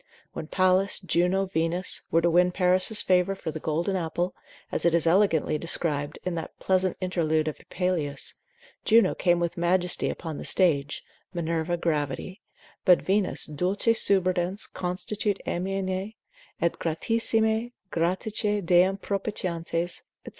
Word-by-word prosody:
When 160 - -6
Pallas, 185 +2 +2
Juno, 185 +1 +1
Venus, 175 0 -2
were 165 0 +2
to 170 - +4
win 180 +1 +4
Paris' 185 +3 +3
favour 185 +1 +2
for 160 - -5
the 160 - -6
golden 165 +6 -1
apple, 175 +1 -2 0.4
as - - -2
it 170 0 +3
is 170 - +2
elegantly 165 -4 +3
described 150 -3 -1
in 180 - -2
that 165 -1 -6
pleasant 185 -1 +1
interlude 160 -4 0
of 155 - -4
Apuleius, 160 -7 -2 0.5
Juno 225 +1 +4
came 175 -1 +2
with 170 0 -2
majesty 180 +1 +1
upon 160 -3 -5
the - - -6
stage, 145 -7 +1 0.3
Minerva 170 0 -1
gravity, 165 +4 -2 0.4
but 180 -2 +6
Venus 195 0 0
dulce 185 +9 0
subridens, 185 0 +1
constitit 195 +3 -2
amaene; 190 +3 -2 0.4
et 170 - 0
gratissimae, 220 +6 +1 0.2
Graticae 200 +4 -1
deam 180 +3 +4
propitiantes, 175 -4 -3 0.2
&c. - - -6
180 Hz, 130 wpm, -26 LUFS, 165-190 Hz, 0.5 s, but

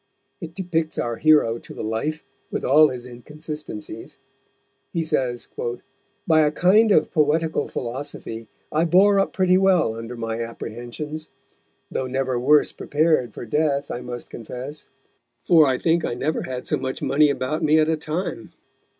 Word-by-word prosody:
It 165 -1 -8
depicts 165 -4 -2
our 120 -1 -2
hero 150 -7 +4
to - - -12
the - - -5
life, 115 +9 -2 0.3
with - - -3
all 150 +4 +6
his 125 -2 -6
inconsistencies. 155 - -8 0.7
He 165 -2 -1
says: 130 -6 -1 0.8
"By 160 -1 +5
a 150 -1 +3
kind 205 +7 +4
of 155 - +3
Poetical 160 0 +1
Philosophy 120 -3 -6 0.2
I 160 +2 +2
bore 195 +4 +5
up 195 - +1
pretty 185 -1 +3
well 185 -11 +3
under 115 +2 -7
my 115 0 -3
Apprehensions; 120 +7 -6 0.6
though 130 - -2
never 130 -1 -1
worse 150 +4 +4
prepared 155 -4 +1
for - - -6
Death, 140 +3 0
I 120 - -4
must 120 -1 -7
confess, 125 +6 -8 0.6
for 160 -4 +6
I 130 -1 +1
think 165 +2 +1
I 120 - -2
never 150 +5 -1
had 125 -1 -5
so - - 0
much 130 0 -4
Money 150 +2 +4
about 140 +2 -2
me 155 +1 +4
at 155 -1 +4
a 160 - +2
time. 155 +4 -4
150 Hz, 160 wpm, -23 LUFS, 125-160 Hz, 0.8 s, all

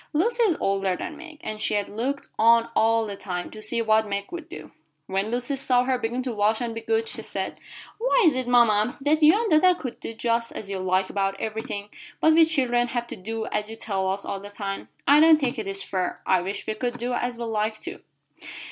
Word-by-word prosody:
Lucy 455 +11 +1
is 400 -9 +3
older 195 -1 0
than 305 - -6
Meg, 320 -1 -11
and 215 0 -5
she 215 - 0
had 205 -1 0
looked 260 +7 -3
on 230 +1 +5
all 225 0 +3
the 205 -2 -5
time 180 -3 -5
to 215 - -10
see 230 +2 -1
what 220 0 +3
Meg 200 +3 -4
would 345 -2 -7
do. 155 0 -9 0.3
When 195 +4 -1
Lucy 245 +4 -1
saw 255 -2 +2
her 255 0 0
begin 245 +2 -2
to 250 -2 -3
wash 210 +1 +2
and 235 -2 -3
be 225 - -5
good, 450 - 0
she - - -6
said: - - -5 0.4
"Why - - +3
is 310 -5 +5
it, 255 -1 -2
mama, 235 -2 +4
that 300 +3 +1
you 315 +7 +6
and 455 -3 -1
dada 360 +4 +5
can 255 -8 -6
do 225 - -6
just 230 0 -1
as 200 -2 -6
you 195 - -3
like 185 0 0
about 195 -1 -1
everything, 215 -2 -4 0.3
but 315 - +5
we 325 0 +7
children 250 -6 +1
have 240 -1 -2
to - - -5
do 220 +3 -4
as 210 0 -2
you 225 - -7
tell 195 -4 -2
us 195 +1 -2
all 195 - -3
the 205 +1 -10
time? 200 -1 -5 0.2
I 285 +1 +7
don't 315 0 +7
think 260 -3 -1
it 215 - -4
is 195 0 -2
fair. 185 -2 -2
I 185 -1 +3
wish 195 +3 -5
we 220 - -1
could 245 +2 -3
do 245 +1 -2
as 245 0 -2
we 235 - -4
like, 215 -1 -1
too." 355 +2 -7
230 Hz, 240 wpm, -25 LUFS, 205-270 Hz, 0.4 s, we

